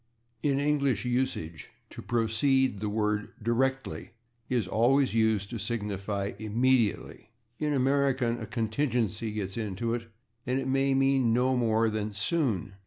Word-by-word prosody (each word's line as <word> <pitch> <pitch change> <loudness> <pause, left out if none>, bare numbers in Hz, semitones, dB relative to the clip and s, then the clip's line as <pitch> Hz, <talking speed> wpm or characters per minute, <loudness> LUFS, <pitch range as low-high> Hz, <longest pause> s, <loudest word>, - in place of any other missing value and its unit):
In 140 -2 +1
English 140 -4 +1
usage, 120 - -2 0.2
to - - -8
proceed, 120 +1 +1
the 105 0 -2
word 105 0 -1
/directly/ 130 +4 -1 0.4
is 120 -5 +1
always 125 +6 +3
used 110 -3 +1
to 115 - -4
signify 100 -2 -3
/immediately/; 110 +1 0 0.3
in 150 -1 0
American 135 -3 +1
a 110 - -6
contingency 115 -1 -1
gets 100 -2 -4
into 115 +1 -2
it, 115 -1 -4 0.4
and 130 +1 +1
it 130 - -3
may 135 +1 +2
mean 135 -3 +3
no 130 +2 +2
more 115 -2 +2
than 105 0 -3
/soon 105 - -1
115 Hz, 135 wpm, -28 LUFS, 105-130 Hz, 0.4 s, always